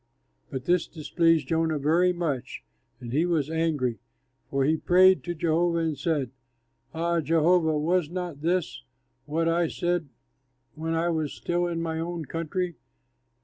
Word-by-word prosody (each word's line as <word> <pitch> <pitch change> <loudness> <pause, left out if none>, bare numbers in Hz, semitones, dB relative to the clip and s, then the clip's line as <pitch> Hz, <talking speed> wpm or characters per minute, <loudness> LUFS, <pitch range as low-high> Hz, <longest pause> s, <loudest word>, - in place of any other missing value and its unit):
But 130 -1 -5
this 175 0 +2
displeased 165 0 +1
Jonah 160 -1 +1
very 165 +6 +3
much 150 -8 -3 0.4
and 120 -1 -7
he 155 +4 +3
was 160 -4 0
angry. 150 -8 0 0.5
And 135 -1 +1
he 155 +3 +3
prayed 185 +3 +5
to 175 -1 -3
Jehovah 170 +1 +1
and 165 -2 0
said, 145 -6 -1 0.6
"Ah, 170 +1 0
Jehovah, 160 +1 +3
was 165 +1 +1
not 175 -4 -5
this 170 -7 -1 0.5
what 165 +2 0
I 170 0 +2
said 175 -2 -1 0.6
when 165 +1 -3
I 165 +1 +1
was 155 -3 -1
still 175 0 -1
in 165 -1 -2
my 160 -1 -2
own 170 -1 -4
country? 165 +1 -3
165 Hz, 145 wpm, -26 LUFS, 155-175 Hz, 0.6 s, prayed